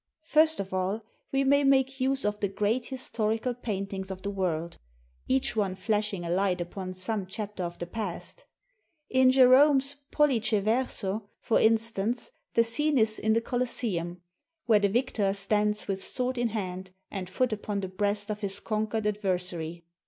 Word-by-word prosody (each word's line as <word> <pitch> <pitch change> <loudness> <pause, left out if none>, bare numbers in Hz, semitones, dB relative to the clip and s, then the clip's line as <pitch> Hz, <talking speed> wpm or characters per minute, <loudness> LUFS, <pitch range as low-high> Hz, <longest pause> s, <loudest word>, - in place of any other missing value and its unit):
First 315 0 +4
of 195 -1 -4
all, 190 +4 -1 0.3
we 270 0 +2
may 280 +1 +4
make 270 0 +3
use 270 -1 +2
of 210 0 -1
the 200 - +1
great 210 +5 -1
historical 235 -2 -1
paintings 195 -5 -4
of 190 -1 -7
the 200 - -2
world, 170 -4 -2 0.5
each 135 - +1
one 200 -4 0
flashing 200 -1 -1
a - - -4
light 185 0 +1
upon 185 +1 -5
some 190 +1 -1
chapter 205 0 -5
of 175 0 -5
the 175 - -4
past. 210 - -5 0.7
In 260 0 +5
Gerome's 270 +2 +5
"Pollice 260 -8 +2
Verso," 215 -1 0
for 225 - +2
instance, 225 +1 +1 0.2
the 230 - +6
scene 290 +6 +1
is 220 -2 +3
in 220 0 +2
the 230 - +2
Colosseum, 225 -8 -2 0.5
where 220 -3 +5
the 200 -1 +2
victor 215 -3 +1
stands 210 +1 0
with 195 -1 -2
sword 255 0 0
in 240 - +2
hand 190 -4 -4 0.2
and 185 -3 -5
foot 245 +5 0
upon 205 -1 -3
the 190 - -3
breast 205 +2 -1
of 210 +1 -5
his 195 -2 -2
conquered 215 0 -2
adversary. 180 -5 -2
210 Hz, 165 wpm, -28 LUFS, 190-245 Hz, 0.7 s, the